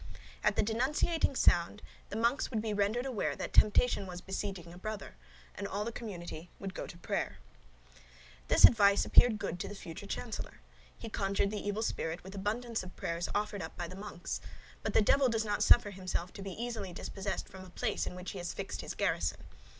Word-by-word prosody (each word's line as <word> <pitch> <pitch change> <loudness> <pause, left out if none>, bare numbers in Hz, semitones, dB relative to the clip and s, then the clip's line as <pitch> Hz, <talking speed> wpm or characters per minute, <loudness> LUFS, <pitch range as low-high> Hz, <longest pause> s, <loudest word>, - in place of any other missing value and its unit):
At - - +3
the - - +3
denunciating 270 +7 +1
sound, 175 -1 +3 0.3
the - - -5
monks 235 +6 +2
would 225 - -1
be 215 0 -1
rendered 205 +5 +1
aware 255 -6 -1
that - - -5
temptation 210 -1 +4
was 180 -1 -6
besieging 190 -2 -4
a - - -11
brother, 215 - -5 0.4
and 200 - -4
all 200 +1 -2
the 235 - -2
community 175 -7 -7
would 195 -1 -5
go - - -5
to 170 - -10
prayers. 170 - -2 1.1
This - - +9
advice 200 -3 +6
appeared 240 -3 +6
good 175 -3 -3
to 195 - -3
the 205 - -7
future 165 -4 -8
chancellor. - - -5 0.4
He - - -7
conjured 200 -1 0
the 210 -1 -4
evil 205 +2 0
spirit 165 -6 -2
with 190 +2 -9
abundance 220 +4 -2
of 185 0 -9
prayers 170 +1 -2
offered 210 -1 -1
up 160 - -7
by 175 - -3
the 185 - -9
monks. 195 -3 -5 0.4
But - - -3
the 220 - +6
devil 270 +4 +5
does 225 -1 0
not 205 -1 0
suffer 210 -4 +6
himself 185 -2 -3
to - - -8
be 195 -1 -5
easily 225 -6 -3
dispossessed 195 +1 -4
from 190 0 -10
a 185 - -12
place 215 +4 -1
in - - -4
which 180 0 -5
he 195 - -6
has 175 -1 -3
fixed - - -4
his - - -6
garrison. - - 0
200 Hz, 205 wpm, -33 LUFS, 185-220 Hz, 1.1 s, This